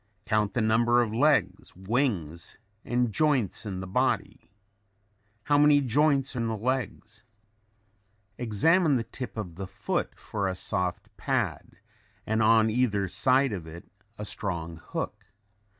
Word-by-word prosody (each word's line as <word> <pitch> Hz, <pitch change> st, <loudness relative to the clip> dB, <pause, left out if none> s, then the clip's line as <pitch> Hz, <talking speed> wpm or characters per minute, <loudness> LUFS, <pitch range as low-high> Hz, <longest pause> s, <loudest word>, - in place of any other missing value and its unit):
Count 105 Hz, -1 st, 0 dB
the 120 Hz, -, +1 dB
number 120 Hz, +2 st, +3 dB
of 110 Hz, -2 st, -4 dB
legs, 110 Hz, -, +1 dB
wings 95 Hz, -, -2 dB, 0.3 s
and 120 Hz, -1 st, 0 dB
joints 130 Hz, -, +1 dB
in 95 Hz, -2 st, -4 dB
the -, -, -5 dB
body. 95 Hz, -, -1 dB, 0.9 s
How 145 Hz, -1 st, +3 dB
many 150 Hz, 0 st, +6 dB
joints 140 Hz, +1 st, +1 dB
in 115 Hz, -2 st, -1 dB
the 110 Hz, -1 st, -2 dB
legs? 115 Hz, -2 st, -3 dB, 1.2 s
Examine 145 Hz, -, +3 dB
the 120 Hz, -, 0 dB
tip 125 Hz, 0 st, -8 dB
of 90 Hz, -6 st, -6 dB
the 95 Hz, -1 st, -5 dB
foot -, -, -3 dB
for 100 Hz, -2 st, -3 dB
a 95 Hz, -, -2 dB
soft 90 Hz, -1 st, -2 dB
pad -, -, -2 dB, 0.5 s
and 110 Hz, +1 st, 0 dB
on 110 Hz, 0 st, +4 dB
either 105 Hz, -5 st, +1 dB
side 130 Hz, +5 st, +2 dB
of 85 Hz, -5 st, -6 dB
it 80 Hz, +2 st, -11 dB, 0.3 s
a 105 Hz, -, -5 dB
strong 85 Hz, -5 st, -3 dB
hook. -, -, -6 dB
110 Hz, 135 wpm, -27 LUFS, 95-125 Hz, 1.2 s, many